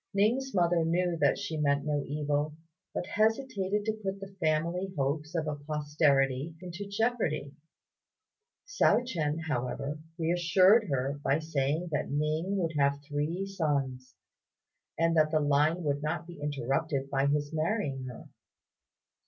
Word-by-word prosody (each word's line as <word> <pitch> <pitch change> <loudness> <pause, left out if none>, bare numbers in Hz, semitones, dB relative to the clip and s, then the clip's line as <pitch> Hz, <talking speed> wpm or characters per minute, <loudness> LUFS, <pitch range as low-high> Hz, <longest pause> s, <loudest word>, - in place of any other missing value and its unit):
Ning's 240 +7 +2
mother 175 -2 +3
knew 175 +1 +1
that - - +3
she 200 -6 -4
meant 140 -1 +1
no 145 -2 0
evil, 150 +1 -1 0.4
but - - -3
hesitated 210 -2 0
to 220 - +1
put 195 -1 -3
the 195 0 -9
family 170 +4 0
hopes 150 +4 -1
of 160 -2 0
a 150 - -1
posterity 145 -1 +1
into 180 +2 -7
jeopardy. 200 - -1 1.1
Hsiao - - +3
ch'ien, 165 -9 -1
however, 140 +2 -2 0.2
reassured 180 +6 +4
her 135 +1 -1
by 135 - +3
saying 155 +1 -1
that 150 - -1
Ning 155 +7 0
would 165 -4 -1
have 140 0 +3
three 155 +6 -1
sons, 140 -9 -2 0.8
and 165 0 +2
that 155 -1 +4
the 155 0 +2
line 150 +4 +2
would 145 -1 0
not 160 +2 -2
be 170 -3 -11
interrupted 140 0 -1
by 135 0 +2
his 145 +1 0
marrying 155 -5 -1
her. 125 -2 -9
155 Hz, 140 wpm, -30 LUFS, 145-180 Hz, 1.1 s, reassured